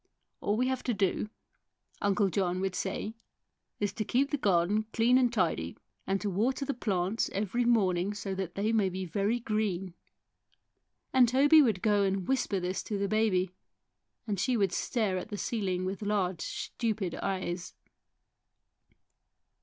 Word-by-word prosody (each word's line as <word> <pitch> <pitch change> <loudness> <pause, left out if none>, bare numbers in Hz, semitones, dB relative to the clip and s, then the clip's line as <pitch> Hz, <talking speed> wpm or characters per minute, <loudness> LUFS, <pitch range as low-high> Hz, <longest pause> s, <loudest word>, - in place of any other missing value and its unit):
" - - -53
All 205 +1 0
we 250 - +2
have 260 0 -1
to 245 - 0
do," 195 +2 0 0.7
Uncle 200 0 +2
John 185 -1 0
would 190 0 -1
say, 195 +3 -3 0.7
"is 205 -1 -1
to 225 - -2
keep 270 +6 +1
the 290 - +1
garden 205 0 +2
clean 235 +2 +4
and 245 -2 +3
tidy, 165 - 0 0.3
and 195 0 +1
to 210 - -2
water 250 +9 0
the 280 - -1
plants 200 -2 -1
every 215 +5 0
morning 200 -4 +2
so 200 -1 -4
that 190 -2 -4
they 210 +3 0
may 210 -4 +2
be 185 +1 -4
very 200 +7 0
green." 205 -5 -1 1.2
And 255 -3 +6
Toby 285 +5 +6
would 220 -9 +1
go 210 -2 +3
and 195 -2 0
whisper 245 -7 +1
this 180 +1 -2
to 210 - -2
the 200 0 0
baby, 195 -4 +1 0.7
and 205 -4 -2
she 250 +5 +1
would 195 -4 +2
stare 210 -6 0
at 200 - -8
the 205 - -4
ceiling 190 -5 -1
with 190 +2 -4
large, 190 -5 0
stupid 215 -6 -3
eyes. 180 -2 -3
200 Hz, 160 wpm, -30 LUFS, 185-225 Hz, 1.2 s, And